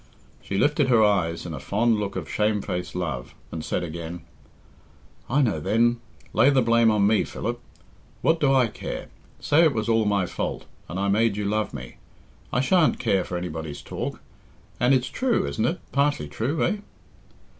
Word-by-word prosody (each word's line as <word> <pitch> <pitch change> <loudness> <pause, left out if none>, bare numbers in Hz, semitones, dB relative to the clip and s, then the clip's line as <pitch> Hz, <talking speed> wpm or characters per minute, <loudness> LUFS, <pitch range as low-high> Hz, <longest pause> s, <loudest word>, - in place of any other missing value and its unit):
She 95 - -4
lifted 145 +4 +3
her 120 -4 +5
eyes 90 -6 +1
in 85 - -5
a 75 - -5
fond 110 - +1
look 100 -1 -3
of 90 -4 -4
shame 105 -1 0
faced 90 0 -4
love, 70 -10 -4 0.2
and 80 -1 -5
said - - -2
again, 85 0 -6 1.1
"I 140 +3 +3
know, 110 -11 +1
then 115 +8 +2 0.3
lay 135 - +5
the 135 -3 +3
blame 115 0 +4
on 105 -2 +3
me, 105 +1 +3
Philip. 120 +1 -4 0.6
What 165 0 +3
do 140 -3 +3
I 130 -2 +5
care? 115 - -6 0.3
Say 155 +4 +4
it 155 -6 +3
was 110 0 -1
all 115 -1 +3
my 100 -2 +2
fault, - - -4 0.2
and 90 - -4
I 100 - 0
made 105 +1 +2
you 105 - -2
love 105 +1 0
me. 65 -4 -9 0.5
I 125 - +2
shan't 160 +4 +3
care 95 -2 +1
for 90 - -4
anybody's 80 -4 -5
talk. - - -5 0.6
And 125 +3 +4
it's 130 0 0
true, 255 -3 0
isn't 70 0 -1
it? - - -1
Partly 140 - +1
true, 125 - -1
eh?" 210 - 0
105 Hz, 185 wpm, -25 LUFS, 90-125 Hz, 1.1 s, her